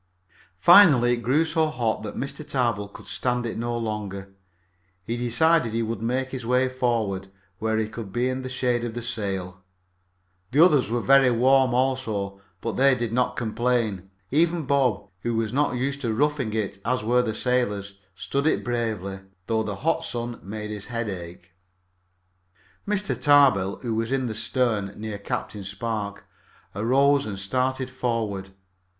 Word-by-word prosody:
Finally 145 - +7
it - - 0
grew 130 +8 +2
so 160 0 +1
hot 120 -9 -1
that 105 - -6
Mr. 140 - -4
Tarbill 120 -8 -1
could 100 - -13
stand 125 -1 -1
it 115 - -3
no 120 +1 -2
longer. 100 -4 -5 0.7
He 115 +5 -3
decided 125 +2 +2
he 115 0 0
would 110 -1 -3
make 130 +3 -1
his 130 -2 -5
way 125 +2 +2
forward, 115 -7 -1 0.3
where 110 0 0
he 110 -1 0
could 110 -2 -8
be 120 +3 0
in 130 0 -2
the 130 - -6
shade 125 -2 0
of 120 -1 -4
the 120 - -4
sail. 95 -6 -4 0.9
The 150 +8 +6
others 145 -10 +3
were 120 +1 0
very 135 +1 +5
warm 130 +1 +4
also, 110 -7 -1 0.2
but 115 - -3
they 135 0 +5
did 120 -2 -3
not 125 0 +1
complain. 110 -4 -1 0.2
Even 165 +3 +2
Bob, 130 -7 +1
who 120 +4 -2
was 110 0 -1
not 140 -2 +1
used 140 +2 -2
to 120 -4 -1
roughing 140 -1 0
it 100 -2 -2
as 125 0 0
were 125 +3 +3
the 110 -3 -2
sailors, 105 -6 -1 0.2
stood 140 +9 -1
it - - +1
bravely, 110 -6 -2 0.3
though 110 0 0
the 105 -2 -3
hot 165 0 +2
sun 120 -5 -4
made 105 +2 -6
his 105 -1 -6
head 115 -2 -3
ache. 85 -2 -8 1.3
Mr. 205 -5 +1
Tarbill, 125 -7 +4
who 115 -2 -1
was 115 +2 -1
in 135 -1 0
the 115 - -3
stern, 110 -4 0
near 105 -1 -5
Captain 100 0 -4
Spark, 100 0 -4 0.5
arose 135 +6 +3
and 100 -2 -5
started 130 +6 -1
forward. 110 -6 -2
120 Hz, 165 wpm, -25 LUFS, 105-130 Hz, 1.3 s, Finally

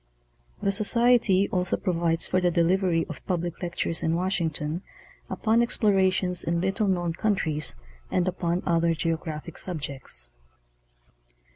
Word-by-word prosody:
The 200 - +2
Society 215 -1 +3
also 180 -1 0
provides 170 -3 +1
for 185 - +1
the 180 - +3
delivery 170 0 +2
of - - -8
public 175 -2 -2
lectures 170 -2 -2
in 160 +1 +1
Wash 185 +2 0
ington 160 0 -2 0.5
upon 225 +1 +2
explorations 190 -5 +2
in 170 0 0
little 195 +4 0
known 175 -3 0
countries 165 - -1 0.3
and 180 0 +1
upon 175 -1 -1
other 170 -1 +2
geographic 160 0 -3
subjects. 140 - -2
175 Hz, 125 wpm, -26 LUFS, 165-190 Hz, 0.5 s, Society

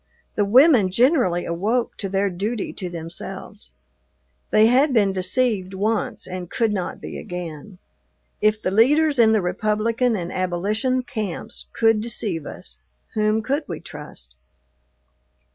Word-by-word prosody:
The 205 - +1
women 245 - +6
generally 235 - +2
awoke 215 +8 -1
to 195 - -3
their 195 +1 +1
duty 205 +5 -3
to 180 - -5
themselves. 165 - -7 0.8
They 215 - +5
had 260 +5 +4
been 205 -5 +3
deceived 190 0 0
once 215 +3 -1
and 180 -1 -6
could 225 -3 0
not 185 -3 -3
be - - -7
again. 175 +1 -7 0.6
If 215 0 +3
the 185 - 0
leaders 285 +7 +4
in 225 -1 +6
the 215 -3 +2
Republican 215 +6 0
and 175 -3 -4
abolition 210 +8 0
camps 215 -2 -5
could 225 -2 +3
deceive 205 -8 -3
us, - - -8 0.3
whom 215 0 +1
could 280 +6 0
we - - -5
trust? 145 - -9
210 Hz, 135 wpm, -22 LUFS, 180-230 Hz, 0.8 s, women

